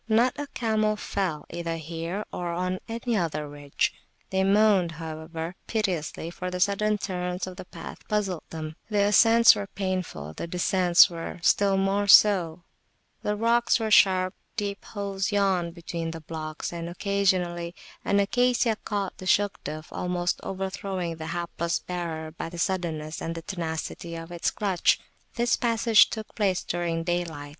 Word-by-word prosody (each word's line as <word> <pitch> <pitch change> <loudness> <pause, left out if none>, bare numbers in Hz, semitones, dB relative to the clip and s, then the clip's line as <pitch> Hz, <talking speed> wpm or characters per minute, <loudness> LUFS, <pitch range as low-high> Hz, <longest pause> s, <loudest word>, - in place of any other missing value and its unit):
Not 235 +3 +4
a 290 - -3
camel 215 -2 +1
fell, 190 -6 -2
either 170 -1 -3
here 165 +5 -4
or 175 -1 -3
on 185 +1 -1
any 230 +1 -2
other 155 -6 -1
ridge: 145 -1 -1 0.4
they 190 0 +2
moaned, 195 -3 +4
however, 160 +1 -6
piteously, 175 -6 -2
for 180 +1 -5
the 180 0 -4
sudden 205 +2 +2
turns 180 -2 -3
of 185 -1 -8
the - - -9
path 170 -2 -10
puzzled 200 -5 -1
them; 155 -1 -6
the 205 -2 +2
ascents 225 +3 +7
were 200 - -4
painful, 185 - -4
the 170 - -5
descents 180 0 +5
were 170 -1 -6
still 195 0 +4
more 195 +1 +1
so; 180 -5 +6 0.6
the 210 - -1
rocks 235 +3 +3
were 220 -1 -2
sharp; 185 -3 +5 0.2
deep 200 -2 -3
holes 200 -1 -3
yawned 190 -4 +1
between 170 -1 -4
the 165 0 -7
blocks, 155 +1 -5
and 170 0 -4
occasionally 180 -2 0 0.3
an 200 - +2
Acacia 240 +2 +2
caught 200 -2 -2
the 185 - -7
Shugduf, 155 -7 0
almost 180 0 -1
overthrowing 190 -3 -4
the 160 0 -6
hapless 170 0 -2
bearer 165 -3 -5
by 165 - -6
the 175 - -9
suddenness 165 -4 -2
and 165 0 -3
the 165 - -6
tenacity 170 -1 -4
of 165 +1 -8
its 170 -1 0
clutch. 195 -4 +2 0.4
This 235 0 +2
passage 230 -2 +4
took 220 -1 -6
place 195 -4 +1
during 170 -1 -2
daylight. 165 -4 -2
180 Hz, 155 wpm, -26 LUFS, 165-205 Hz, 0.6 s, ascents